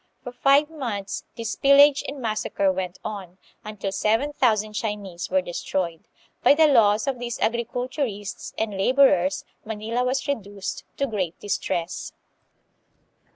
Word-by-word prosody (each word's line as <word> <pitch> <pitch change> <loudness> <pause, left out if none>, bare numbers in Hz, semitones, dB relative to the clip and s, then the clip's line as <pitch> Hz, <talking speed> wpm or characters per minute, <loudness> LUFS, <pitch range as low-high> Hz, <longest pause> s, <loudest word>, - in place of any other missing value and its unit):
For 245 - -6
Qye 275 +4 +4
months 235 -11 -4
this 230 -1 -3
pillage 280 +1 +6
and 280 0 -6
massacre 215 -4 0
went 185 -1 -4
on, 195 -4 -6 0.3
until 210 -2 -5
seven 225 +9 +1
thousand 215 -6 +1
Chinese 205 -5 -4
were 185 0 +2
destroyed. 175 -1 -3 0.3
By - - +6
the 320 +1 +6
loss 215 -7 +4
of 265 -3 -2
these 240 -1 -4
agriculturists 235 -2 -2
and 220 -2 -2
laborers 195 -4 +3 0.2
Manila 220 +3 -2
was 260 +3 -1
reduced 205 -7 -4
to 275 - +1
great 190 -9 -3
distress. 180 -4 -3
215 Hz, 130 wpm, -24 LUFS, 195-255 Hz, 0.3 s, pillage